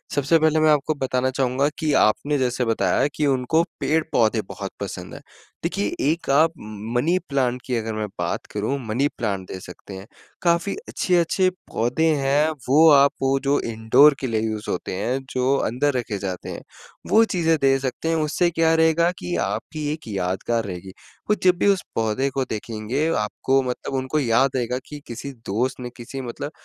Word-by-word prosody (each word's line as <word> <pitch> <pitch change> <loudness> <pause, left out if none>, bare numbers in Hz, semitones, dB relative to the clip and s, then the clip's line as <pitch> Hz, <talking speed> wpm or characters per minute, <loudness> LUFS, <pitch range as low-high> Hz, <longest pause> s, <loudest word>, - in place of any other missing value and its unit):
सबसे 145 +3 +3
पहले 155 0 +3
मैं 155 0 +4
आपको 150 +1 +2
बताना 130 -2 0
चाहूँगा 135 +2 +1
कि 155 -2 0
आपने 145 +7 +2
जैसे 125 -1 0
बताया 115 +4 +2
कि 150 - 0
उनको 135 +5 +2 0.2
पेड़-पौधे 135 -7 +1
बहुत - - -6
पसंद - - -6
हैं। - - -9 0.4
देखिए 100 - -1 0.2
एक 170 -2 -4
आप 155 +4 +4
म 110 +1 -8
मनी 170 +7 +2
प्लांट 125 -2 0
की 125 - -1
अगर 115 -1 -2
मैं 110 0 -3
बात - - -2
करूँ, 110 +7 -1
मनी 125 +6 +1
प्लांट 100 -5 -2
दे 95 - -7
सकते 90 +2 -11
हैं। 95 +2 -10 0.3
काफ़ी 170 +2 +1
अच्छे-अच्छे 180 +1 +2
पौधे 160 -4 -2
हैं, 145 +2 +2 0.2
वो 155 +4 +7
आप 140 -1 +6
वो 135 0 +2
जो 140 +1 +2
इंडोर 120 +7 +5
के 130 - -2
लिए 110 -2 0
यूज़ 110 -1 -3
होते 90 - -3
हैं 120 +7 -1
जो 130 +2 +2
अंदर 135 +5 0
रखे 110 -4 -3
जाते 95 -2 -5
हैं, - - -6 0.5
वो 225 +1 +6
चीज़ें 165 -6 +1
दे 135 0 +4
सकते 135 +4 -3
हैं 165 - +2
उससे 160 +3 +1
क्या 165 -1 +2
रहेगा 160 +2 +3
कि 175 - -3
आपकी 155 -2 -4
एक 155 - -10
यादगार 100 +3 -1
रहेगी, 95 0 -7 0.4
वो 210 - +4
जब 180 -1 +5
भी 205 - +2
उस 195 -2 +3
पौधे 115 +5 0
को 135 0 -1
देखेंगे 110 +6 -2
आपको 130 +5 +1
मतलब 125 +2 -4
उनको 130 +3 -1
याद 130 0 +3
रहेगा 125 0 -1
कि 150 -1 -9
किसी 120 +4 -6 0.2
दोस्त 125 +7 -1
ने 125 - -5
किसी 130 +3 -7
मतलब 130 +4 -6
135 Hz, 185 wpm, -23 LUFS, 115-155 Hz, 0.5 s, वो